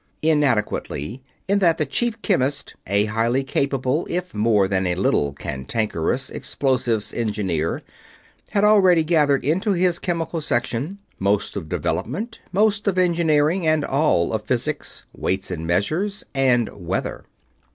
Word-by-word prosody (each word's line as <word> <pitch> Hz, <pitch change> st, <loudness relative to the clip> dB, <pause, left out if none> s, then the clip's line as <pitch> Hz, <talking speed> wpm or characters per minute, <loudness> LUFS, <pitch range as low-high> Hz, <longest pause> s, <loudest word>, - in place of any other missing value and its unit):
"Inadequately" 130 Hz, -, 0 dB, 0.3 s
in 200 Hz, +1 st, +2 dB
that 170 Hz, -4 st, +3 dB
the 155 Hz, -, +1 dB
Chief 235 Hz, +4 st, -1 dB
Chemist, 145 Hz, -, 0 dB
a 100 Hz, +2 st, +2 dB
highly 115 Hz, +5 st, 0 dB
capable 135 Hz, +2 st, 0 dB
if 180 Hz, +1 st, -3 dB
more 105 Hz, -2 st, +3 dB
than 95 Hz, -1 st, 0 dB
a 90 Hz, -, 0 dB
little 75 Hz, -6 st, +1 dB
cantankerous 80 Hz, -, -2 dB
Explosives 125 Hz, -5 st, -1 dB
Engineer, 100 Hz, -8 st, -1 dB, 0.7 s
had 200 Hz, -, +1 dB
already 190 Hz, -6 st, +5 dB
gathered 150 Hz, -5 st, +2 dB
into 185 Hz, +8 st, +1 dB
his 180 Hz, -1 st, +2 dB
Chemical 165 Hz, -1 st, -2 dB
Section 135 Hz, +5 st, -1 dB, 0.2 s
most 100 Hz, +1 st, 0 dB
of 85 Hz, -6 st, -5 dB
Development, 215 Hz, -, -3 dB
most 210 Hz, +2 st, +2 dB
of 190 Hz, -2 st, +1 dB
Engineering, 170 Hz, -1 st, +2 dB
and 155 Hz, -2 st, +2 dB
all 135 Hz, -, +2 dB
of 110 Hz, -, 0 dB
Physics, 130 Hz, +6 st, -2 dB
Weights 95 Hz, 0 st, -2 dB
and 80 Hz, -2 st, -4 dB
Measures, 155 Hz, -, 0 dB
and 125 Hz, -4 st, +3 dB
Weather. 90 Hz, -4 st, -4 dB
135 Hz, 130 wpm, -22 LUFS, 105-170 Hz, 0.7 s, already